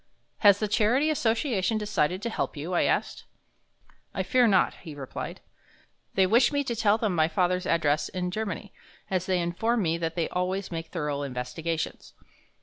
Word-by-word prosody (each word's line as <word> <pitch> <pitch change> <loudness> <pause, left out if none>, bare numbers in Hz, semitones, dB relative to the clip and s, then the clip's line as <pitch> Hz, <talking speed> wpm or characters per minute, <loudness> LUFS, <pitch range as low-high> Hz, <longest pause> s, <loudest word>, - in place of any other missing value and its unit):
"Has 205 -2 +7
the 215 - -1
charity 245 +8 +2
association 225 -5 +1
decided 205 -3 0
to 235 - -2
help 170 - -3
you?" 160 +6 -4
I 175 - +3
asked. - - -1 0.9
"I - - 0
fear 250 -2 +3
not," 195 -4 +3
he 160 -5 -9
replied. 135 -2 -6 0.7
"They 190 - +5
wish 235 +8 +4
me 285 -1 +1
to 240 -3 -3
tell 215 -1 +3
them 215 -4 0
my 160 -2 +3
father's 180 +2 0
address 150 -3 +1
in 180 -1 -3
Germany, 205 0 -4 0.4
as 185 -1 0
they 185 -1 +2
inform 210 +7 0
me 165 0 0
that 165 -1 -2
they 170 -2 0
always 185 +2 -2
make 165 -1 -4
thorough 150 -4 -3
investigations. 140 +5 -4
185 Hz, 170 wpm, -27 LUFS, 165-220 Hz, 0.9 s, Has